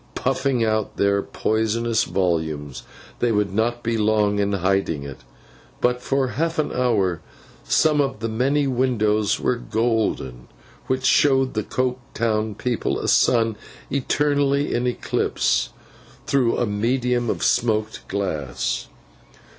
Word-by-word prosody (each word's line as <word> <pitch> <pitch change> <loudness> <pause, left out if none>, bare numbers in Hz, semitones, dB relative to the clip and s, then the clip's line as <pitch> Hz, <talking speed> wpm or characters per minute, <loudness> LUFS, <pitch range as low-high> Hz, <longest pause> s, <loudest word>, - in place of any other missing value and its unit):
Puffing 130 -2 0
out 110 -1 -1
their 100 0 +2
poisonous 110 +2 0
volumes, 80 -6 -2 0.4
they 120 - +2
would 105 -2 0
not 120 +3 0
be 115 -1 0
long 105 -1 +2
in 100 0 +1
hiding 95 -5 0
it; 70 -2 -8 0.6
but, 125 0 +1
for 135 0 0
half 165 +6 -2
an 155 - 0
hour, 100 -9 +1 0.4
some 155 -2 +3
of 135 -5 -2
the 115 - -2
many 135 +6 +1
windows 110 -5 +1
were 125 - 0
golden, 110 - -1 0.4
which 130 0 -1
showed 135 -2 +3
the 110 - 0
Coketown 115 -3 -2
people 125 -2 -1
a - - -3
sun 115 -2 +3 0.4
eternally 140 +1 +1
in 120 +1 0
eclipse, 125 - 0 0.6
through 130 -4 +2
a 120 - +1
medium 120 +3 0
of - - -2
smoked 110 -2 0
glass. 80 -10 -2
115 Hz, 125 wpm, -22 LUFS, 105-130 Hz, 0.6 s, some